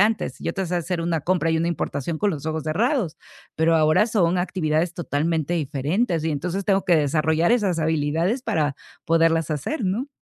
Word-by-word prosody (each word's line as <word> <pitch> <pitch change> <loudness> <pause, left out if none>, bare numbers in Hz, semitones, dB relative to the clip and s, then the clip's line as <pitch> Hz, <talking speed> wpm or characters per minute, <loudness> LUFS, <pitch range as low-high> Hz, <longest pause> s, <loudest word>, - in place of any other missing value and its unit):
antes. 215 +2 +1
Yo - - -2
te 190 -2 -3
sé 180 - -2
hacer 175 0 -2
una 165 -1 -1
compra 170 0 +1
y 160 - +1
una 170 +1 0
importación 155 -1 -3
con 205 -1 +1
los 155 -2 -5
ojos 160 -1 -2
cerrados, 210 - 0 0.4
pero 165 +1 +3
ahora 155 +7 +4
son 185 -5 +1
actividades 175 -2 0
totalmente 165 0 -1
diferentes 160 - -1
y, 160 - 0
entonces, 180 +6 -3
tengo 195 0 +2
que 175 -3 +4
desarrollar 155 - +2
esas 200 -8 +1
habilidades 160 - 0
para 150 - 0 0.3
poderlas 165 -1 +2
hacer, 215 - -3
¿no? 225 +10 -1
165 Hz, 180 wpm, -23 LUFS, 155-185 Hz, 0.4 s, ahora